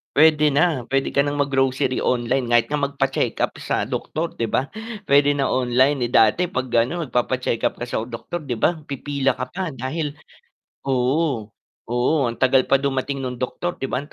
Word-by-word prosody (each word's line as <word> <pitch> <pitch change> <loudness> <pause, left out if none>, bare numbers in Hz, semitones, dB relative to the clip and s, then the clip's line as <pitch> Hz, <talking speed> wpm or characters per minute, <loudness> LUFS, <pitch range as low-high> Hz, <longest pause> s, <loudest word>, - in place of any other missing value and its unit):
Puwede 150 -1 +5
na, 150 -5 +2
puwede 135 +1 0
ka 140 - +2
ng 145 0 -1
mag-grocery 135 -2 +1
online, 125 +1 0
kahit 120 0 +3
nga 150 - 0
magpa-check-up 135 -1 -1
sa - - -1
doktor 165 +2 -3
'di 115 - 0
ba? 130 +5 -1 0.4
Puwede 145 +1 +5
na 140 -2 0
online, 130 +1 +2
eh, 120 - -5
dati 115 +11 +4
'pag 130 -5 -3
gano 120 +9 +1
magpapa-check-up 125 -3 0
ka - - -1
sa 110 - -2
doktor 145 +7 -6
'di 125 - -2
ba, 160 +9 +1
pipila 140 -1 -1
ka 130 - -5
pa 180 -4 -4
dahil 145 +4 -3 0.7
oo, 130 -2 0 0.4
oo, 120 +4 +1 0.2
ang 115 - -5
tagal 130 0 +3
pa 135 - +5
dumating 135 0 -2
nung 125 -1 -5
doktor 175 +7 -3
'di 135 - -2
ba 130 +3 -2
ang 150 - -18
135 Hz, 180 wpm, -22 LUFS, 125-145 Hz, 0.7 s, Puwede